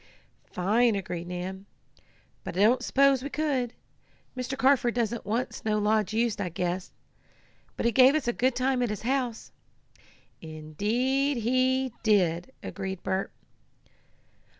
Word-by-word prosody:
"Fine!" 220 +5 +2
agreed 175 -3 -4
Nan. 185 +2 -6 0.8
"But - - -6
I - - +2
don't 240 +5 +4
s'pose 275 0 +3
we 280 - -5
could. 275 -5 -1 0.6
Mr. 255 +1 -4
Carford 260 -3 +3
doesn't 235 -1 -2
want 235 +4 -1
Snow 215 -1 -1
Lodge 210 -1 +1
used, 225 -1 0
I 180 - -2
guess. 180 +2 -3 0.9
But - - -2
he 235 - +4
gave 260 +4 +6
us 305 -5 -1
a 240 - +1
good 255 +2 +1
time 255 0 +1
at 245 - +1
his 210 0 -5
house." 250 -2 -2 0.9
"Indeed 220 - -1
he 255 +2 +1
did," 185 -2 +2
agreed 190 -2 -5
Bert. 190 0 -2
235 Hz, 135 wpm, -27 LUFS, 195-255 Hz, 0.9 s, gave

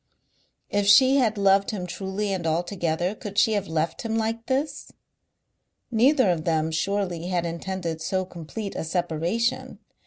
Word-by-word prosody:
If 205 -1 +1
she 260 +6 +7
had 225 -5 +2
loved 195 0 +3
him 195 -4 -3
truly 195 +3 -3
and 175 -3 -2
altogether 175 +1 -1
could 205 -1 -8
she 210 +2 +4
have 200 -2 -1
left 160 0 -1
him 225 -1 -2
like 225 +1 -2
this? 280 +2 -2 1.0
Neither 250 -2 +4
of 165 -3 -2
them 160 -1 0
surely 180 0 -1
had 180 -2 0
intended 170 -1 -4
so 185 +3 -1
complete 185 +4 -7
a - - -3
separation. 175 +7 -1
190 Hz, 150 wpm, -25 LUFS, 170-220 Hz, 1.0 s, she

